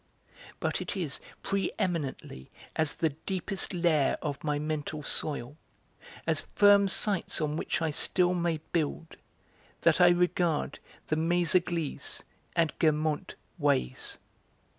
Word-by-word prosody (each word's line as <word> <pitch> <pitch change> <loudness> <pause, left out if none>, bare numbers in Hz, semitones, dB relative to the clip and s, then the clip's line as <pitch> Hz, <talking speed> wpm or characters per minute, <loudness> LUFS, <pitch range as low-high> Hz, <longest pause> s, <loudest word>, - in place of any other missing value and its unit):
But - - -1
it - - -4
is 160 -7 -2 0.2
pre 195 0 0
eminently 145 - -3 0.3
as 160 -2 +1
the 160 - +1
deepest 190 +5 -2
layer 170 -6 +2
of 145 -2 -3
my 150 -1 0
mental 150 0 -3
soil, 145 -1 0 0.7
as - - +1
firm 205 -1 +6
sites 195 0 +1
on 150 -1 -1
which 165 +1 -1
I 160 - +1
still 180 +4 +2
may 170 -3 0
build, 160 0 -2 0.6
that 165 +1 +4
I 175 - +8
regard 175 -2 +1 0.3
the 155 - 0
Méséglise 170 -2 0 0.3
and 165 -2 +2
Guermantes 155 -1 +1 0.2
'ways.' 65 0 0
160 Hz, 120 wpm, -29 LUFS, 150-175 Hz, 0.7 s, I